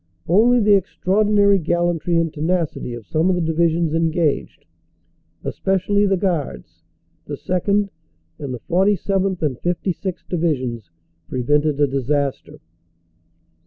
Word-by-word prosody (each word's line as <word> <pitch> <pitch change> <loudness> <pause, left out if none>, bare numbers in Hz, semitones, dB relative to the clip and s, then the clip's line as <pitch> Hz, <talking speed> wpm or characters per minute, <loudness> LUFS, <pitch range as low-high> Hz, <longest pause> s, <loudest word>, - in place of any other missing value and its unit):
Only 230 +8 +4
the 210 -2 +4
extraordinary 200 +1 +2
gallantry 175 0 0
and 165 -2 0
tenacity 160 -6 -2
of 115 -3 -10
some 160 - +1
of 185 - +2
the 175 - -1
divisions 165 0 +1
engaged, 165 -2 0 0.8
especially 195 +2 +1
the 195 -1 +2
Guards, 165 - -3 0.5
the - - -4
2nd., 200 +3 0 0.5
and 140 -3 -5
the 125 -3 -6
47th. 190 0 +1
and 140 -5 0
56th. 180 +1 -3
Divisions, 130 - -2 0.4
prevented 145 +3 +1
a 145 - +5
disaster. 140 +1 -2
170 Hz, 115 wpm, -21 LUFS, 150-190 Hz, 0.8 s, a